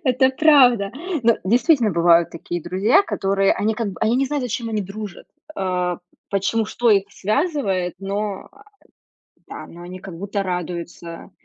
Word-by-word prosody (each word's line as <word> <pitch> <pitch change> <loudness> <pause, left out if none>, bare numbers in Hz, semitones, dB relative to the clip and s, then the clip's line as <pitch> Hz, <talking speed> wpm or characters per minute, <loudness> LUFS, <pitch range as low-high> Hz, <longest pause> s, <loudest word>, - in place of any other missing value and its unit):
Это 260 0 +3
правда. 260 -8 +5 0.3
Ну, 230 0 +3
действительно 240 - +3
бывают 170 0 +4
такие 170 0 -6
друзья, 220 - +3
которые 195 - +1
они, 220 +1 -1
как 225 -1 -2
бы, - - -13
они 225 +3 +2
не 275 - +2
знают, 290 -1 -2
зачем 235 -1 -3
они 215 -2 -1
дружат. 200 0 -8 0.3
А 180 -2 -1 0.3
почему 200 +3 0
что 235 +1 0
их 195 -2 +4
связывает, 210 - -1
но, 200 0 -4
э, - - -25 0.9
да. - - -9
Но 175 - -13
они 180 +1 -9
как 180 -3 -9
будто 200 +1 -3
радуются. 175 -2 -6
200 Hz, 155 wpm, -21 LUFS, 180-235 Hz, 0.9 s, правда